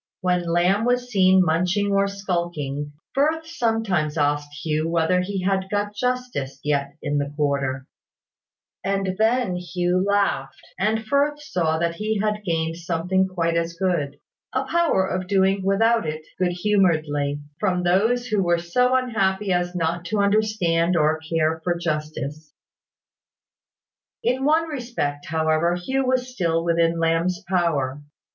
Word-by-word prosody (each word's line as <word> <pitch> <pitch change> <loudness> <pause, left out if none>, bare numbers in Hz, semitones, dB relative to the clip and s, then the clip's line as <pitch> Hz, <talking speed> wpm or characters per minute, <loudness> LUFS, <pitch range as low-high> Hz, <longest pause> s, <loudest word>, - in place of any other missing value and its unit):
When 180 -2 0
Lamb 180 +5 +2
was 245 0 0
seen 190 -2 +5
munching 180 +5 +1
or 200 0 +3
skulking, 170 -7 -3 0.2
Firth 315 +4 +1
sometimes 225 - -1
asked 145 0 0
Hugh 155 +1 0
whether 170 +2 +2
he 190 0 -3
had 190 0 0
got 205 0 -1
justice 245 - -2
yet 140 -1 -1
in 145 0 0
that 145 0 -4
quarter: 140 -3 -1 1.0
and 195 -1 -1
then 225 -4 +2
Hugh 180 +1 0
laughed; 200 -10 0 0.2
and 220 +3 0
Firth 285 +4 +1
saw 175 - -1
that 170 +1 0
he 215 0 -1
had 210 0 -1
gained 165 -3 -1
something 175 +3 0
quite 170 -3 -1
as 170 0 0
good, 165 -6 -1 0.4
a 260 +1 +1
power 330 - +2
of 185 -1 -3
doing 195 0 +2
without 225 +1 +2
it 155 0 -5
good 180 -1 +1
humouredly, 160 -7 +1 0.2
from 180 -3 0
those 220 +8 +2
who 215 -5 0
were 175 -2 +2
so 250 +10 +1
unhappy 210 -6 +1
as 175 0 -1
not 170 0 -1
to 210 +5 -2
understand 200 -5 +2
or 155 0 +2
care 160 0 -1
for 175 -1 0
justice. 155 -2 -4 1.7
In 260 +2 +1
one 320 +2 +3
respect, 235 - -3
however, 160 +2 +1
Hugh 260 +9 -1
was 255 0 0
still 165 -6 0
within 170 0 +2
Lamb's 165 +2 +1
power. 150 -7 0
180 Hz, 140 wpm, -23 LUFS, 160-210 Hz, 1.7 s, seen